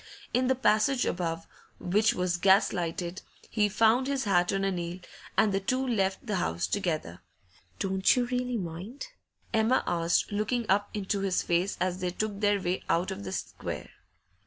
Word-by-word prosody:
In 250 Hz, +1 st, +2 dB
the 260 Hz, -, +3 dB
passage 250 Hz, +1 st, +2 dB
above, 165 Hz, -2 st, -2 dB, 0.3 s
which 210 Hz, +4 st, +2 dB
was 180 Hz, -1 st, 0 dB
gas 195 Hz, +3 st, +4 dB
lighted, 175 Hz, 0 st, -3 dB, 0.3 s
he 210 Hz, -2 st, +2 dB
found 225 Hz, +5 st, +3 dB
his 275 Hz, -2 st, 0 dB
hat 175 Hz, -4 st, +2 dB
on 195 Hz, 0 st, 0 dB
a 195 Hz, -, +1 dB
nail, 175 Hz, -1 st, -4 dB, 0.4 s
and 210 Hz, -2 st, +4 dB
the 195 Hz, -, +2 dB
two 255 Hz, +7 st, 0 dB
left 195 Hz, -4 st, 0 dB
the 210 Hz, -4 st, -1 dB
house 85 Hz, -, -1 dB
together. 155 Hz, -, -2 dB, 0.6 s
'Don't 190 Hz, 0 st, +2 dB
you 250 Hz, -1 st, +1 dB
really 250 Hz, 0 st, -1 dB
mind?' 195 Hz, -, -6 dB, 0.4 s
Emma 225 Hz, +3 st, +3 dB
asked, 170 Hz, +2 st, +1 dB
looking 220 Hz, +4 st, -1 dB
up 205 Hz, +1 st, +2 dB
into 200 Hz, 0 st, -1 dB
his 195 Hz, -2 st, 0 dB
face 175 Hz, +3 st, 0 dB
as 180 Hz, 0 st, -1 dB
they 180 Hz, -1 st, -1 dB
took 205 Hz, +2 st, -3 dB
their 205 Hz, -1 st, +2 dB
way 180 Hz, 0 st, -1 dB
out 175 Hz, +2 st, +1 dB
of 100 Hz, -, -6 dB
the 95 Hz, -, -5 dB
square. -, -, -5 dB
195 Hz, 175 wpm, -29 LUFS, 175-220 Hz, 0.6 s, gas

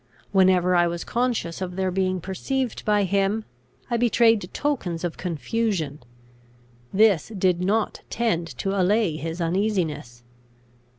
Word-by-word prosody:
Whenever 185 Hz, -2 st, +4 dB
I 175 Hz, 0 st, +4 dB
was 170 Hz, 0 st, -3 dB
conscious 235 Hz, -8 st, -1 dB
of 180 Hz, -1 st, -4 dB
their 190 Hz, -1 st, 0 dB
being 185 Hz, -1 st, 0 dB
perceived 250 Hz, -, -3 dB
by 210 Hz, -1 st, +3 dB
him, 200 Hz, +3 st, 0 dB, 0.4 s
I 235 Hz, -, 0 dB
betrayed 225 Hz, -4 st, +3 dB
tokens 195 Hz, -, -2 dB
of 175 Hz, -2 st, -2 dB
confusion: 175 Hz, -3 st, -2 dB, 0.9 s
this 205 Hz, -2 st, +3 dB
did 180 Hz, -2 st, +2 dB
not 210 Hz, +4 st, 0 dB
tend 210 Hz, -8 st, 0 dB
to 195 Hz, -, -2 dB
allay 195 Hz, -2 st, +2 dB
his 165 Hz, +2 st, -5 dB
uneasiness. 165 Hz, -, -1 dB
190 Hz, 125 wpm, -24 LUFS, 175-220 Hz, 0.9 s, Whenever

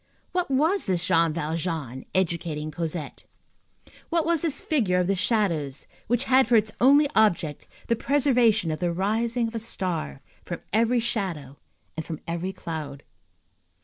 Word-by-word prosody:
What 360 Hz, -3 st, -1 dB
was 315 Hz, -, +1 dB
this 180 Hz, -2 st, 0 dB
Jean 165 Hz, -2 st, +3 dB
Valjean 155 Hz, -4 st, -3 dB
educating 165 Hz, -4 st, -1 dB
Cosette? 160 Hz, -1 st, -5 dB, 0.8 s
What 335 Hz, -2 st, +1 dB
was 335 Hz, -1 st, +2 dB
this 310 Hz, -5 st, 0 dB
figure 220 Hz, -, +1 dB
of 180 Hz, -, +2 dB
the 195 Hz, -, +1 dB
shadows 180 Hz, -, 0 dB, 0.2 s
which 240 Hz, +2 st, +1 dB
had 265 Hz, -2 st, +4 dB
for 235 Hz, -, +4 dB
its 215 Hz, -1 st, +3 dB
only 285 Hz, +4 st, +6 dB
object 170 Hz, -9 st, +1 dB, 0.2 s
the 230 Hz, -, +1 dB
preservation 240 Hz, -, +2 dB
of 155 Hz, -, -3 dB
the 175 Hz, -1 st, 0 dB
rising 225 Hz, +6 st, 0 dB
of 225 Hz, -, -8 dB
a 230 Hz, -, -2 dB
star 180 Hz, -, -4 dB, 0.2 s
from -, -, -6 dB
every 230 Hz, +3 st, +3 dB
shadow 180 Hz, -, -3 dB, 0.4 s
and 160 Hz, -, -3 dB
from 160 Hz, -2 st, -6 dB
every 170 Hz, +3 st, -2 dB
cloud? 155 Hz, -6 st, -6 dB
190 Hz, 150 wpm, -25 LUFS, 165-235 Hz, 0.8 s, only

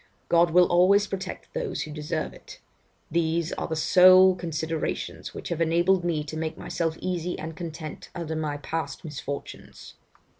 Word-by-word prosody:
God 170 Hz, 0 st, +5 dB
will 180 Hz, +2 st, +6 dB
always 185 Hz, +4 st, +4 dB
protect 195 Hz, -1 st, -6 dB
those -, -, -2 dB
who 155 Hz, -, -8 dB
deserve 150 Hz, 0 st, -3 dB
it. -, -, -13 dB, 0.5 s
These 165 Hz, 0 st, 0 dB
are -, -, -3 dB
the 160 Hz, -, -2 dB
sole 185 Hz, +3 st, +7 dB
considerations 165 Hz, -2 st, -4 dB
which -, -, -6 dB
have 170 Hz, -1 st, -2 dB
enabled 170 Hz, +3 st, +3 dB
me 165 Hz, -3 st, 0 dB
to 155 Hz, +1 st, -7 dB
make 160 Hz, 0 st, -3 dB
myself 165 Hz, -1 st, -2 dB
easy 180 Hz, -1 st, -2 dB
and 160 Hz, 0 st, -6 dB
content 160 Hz, -2 st, -7 dB
under 165 Hz, -2 st, -4 dB
my 150 Hz, -2 st, -2 dB
past 150 Hz, 0 st, -4 dB
misfortunes. 140 Hz, -2 st, -7 dB
165 Hz, 155 wpm, -26 LUFS, 155-180 Hz, 0.5 s, sole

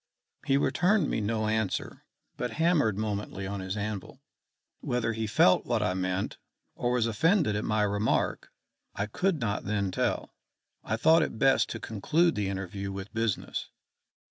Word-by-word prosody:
He 135 Hz, -, +4 dB
returned 180 Hz, +4 st, +2 dB
me -, -, 0 dB
no 110 Hz, +1 st, -1 dB
answer, 110 Hz, -3 st, -2 dB, 0.3 s
but 125 Hz, -2 st, -3 dB
hammered 155 Hz, -, +2 dB
momently 105 Hz, -2 st, -3 dB
on 100 Hz, +1 st, -4 dB
his 95 Hz, +2 st, -4 dB
anvil. 105 Hz, -2 st, -5 dB, 0.6 s
Whether 120 Hz, -2 st, -1 dB
he 110 Hz, 0 st, -2 dB
felt 90 Hz, -3 st, +4 dB
what 120 Hz, -3 st, +1 dB
I 100 Hz, -, +1 dB
meant, 95 Hz, +1 st, -2 dB, 0.3 s
or 120 Hz, -, -1 dB
was 120 Hz, -2 st, +2 dB
offended 140 Hz, -, +2 dB
at 105 Hz, -, -1 dB
my 105 Hz, -1 st, +1 dB
remark, 105 Hz, +1 st, 0 dB, 0.5 s
I 100 Hz, -, -1 dB
could 170 Hz, -, 0 dB
not 105 Hz, -4 st, -2 dB
then 100 Hz, -2 st, 0 dB
tell. -, -, -1 dB, 0.5 s
I 110 Hz, -, -1 dB
thought 160 Hz, +7 st, +5 dB
it 155 Hz, -, -2 dB
best 130 Hz, -4 st, +3 dB
to -, -, -5 dB
conclude 155 Hz, -, +1 dB
the 100 Hz, -2 st, -1 dB
interview 95 Hz, +1 st, -4 dB
with 95 Hz, +2 st, -7 dB
business. 115 Hz, -3 st, -2 dB
110 Hz, 160 wpm, -29 LUFS, 100-125 Hz, 0.6 s, thought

